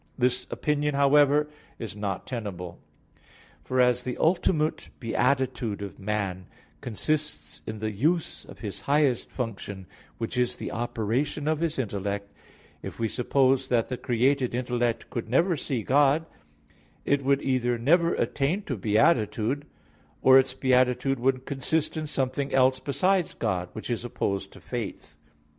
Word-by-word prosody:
This 125 0 +1
opinion, 150 -1 0
however, 145 +1 +4 0.3
is 115 -3 -6
not 100 -2 -3
tenable. 100 -8 -6 0.8
For 130 - -1
as 125 0 +4
the 125 - -4
ultimate 160 -2 +1
beatitude 120 -3 0
of 100 - -8
man 95 -3 -2 0.3
consists 150 +6 -2
in 110 - -4
the 110 0 -2
use 155 - 0
of - - -13
his 105 -4 -5
highest 140 -4 +2
function, 100 -5 -5 0.3
which 115 +2 -3
is 125 -1 +1
the - - -6
operation 120 +6 -1
of 155 -1 +1
his 165 -1 -1
intellect; 100 -3 -3 0.5
if - - -8
we 115 - +1
suppose 130 +3 +2
that 120 -2 +1
the 130 - -2
created 125 +1 +1
intellect 120 -2 -1
could 115 -2 -4
never 170 +8 +3
see 130 -5 -3
God, 145 +5 +3 0.8
it 140 -1 +2
would 140 +1 +2
either 125 -2 +1
never 170 +8 +3
attain 155 +9 0
to 130 -9 -4
beatitude, 110 - +2 0.6
or 130 0 +8
its 135 - 0
beatitude 130 0 +2
would 130 +1 +1
consist 140 +3 -1
in 155 -1 -3
something 135 0 -1
else 130 0 +4
beside 165 +7 +1
God; 90 -1 -1
which 110 +2 -5
is 115 -1 -2
opposed 100 -5 -2
to - - -13
faith. 75 - -6
130 Hz, 145 wpm, -27 LUFS, 115-140 Hz, 0.8 s, or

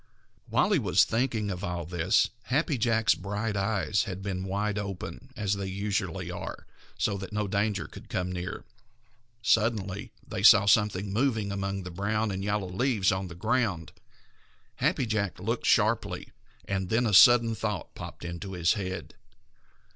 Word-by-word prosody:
While - - +2
he - - +4
was - - +4
thinking 115 -3 0
of 90 +1 -5
all 90 -4 -3
this, 85 +2 +2
Happy 145 +3 +1
Jack's 115 -1 +3
bright 105 +3 -3
eyes 100 -1 0
had 95 0 -6
been 95 -1 -3
wide 105 +2 -1
open, 100 -3 -6
as 105 -1 0
they 100 -1 -3
usually 100 -1 -2
are, - - -7 0.3
so 100 - 0
that 95 -1 -7
no 105 -1 -1
danger 100 0 0
should - - -12
come 90 0 -2
near. 90 +1 -5 0.8
Suddenly 105 -4 +1 0.2
they - - -4
saw 100 - +8
something 100 -1 +2
moving 110 -4 +1
among 100 0 -3
the 90 - -7
brown 105 +4 -1
and 95 0 -4
yellow 100 -1 -1
leaves 105 -1 +1
on 95 0 -2
the 85 - -9
ground. 105 -4 0 0.9
Happy - - +1
Jack 105 -5 -1
looked - - -2
sharply, - - +1 0.3
and 95 -2 -2
then 115 +4 +2
a 110 - 0
sudden 115 +2 +7
thought 110 -1 -4
popped - - -9
into 85 +3 -6
his 85 -1 +2
head. 95 -5 -5
100 Hz, 160 wpm, -28 LUFS, 95-110 Hz, 0.9 s, saw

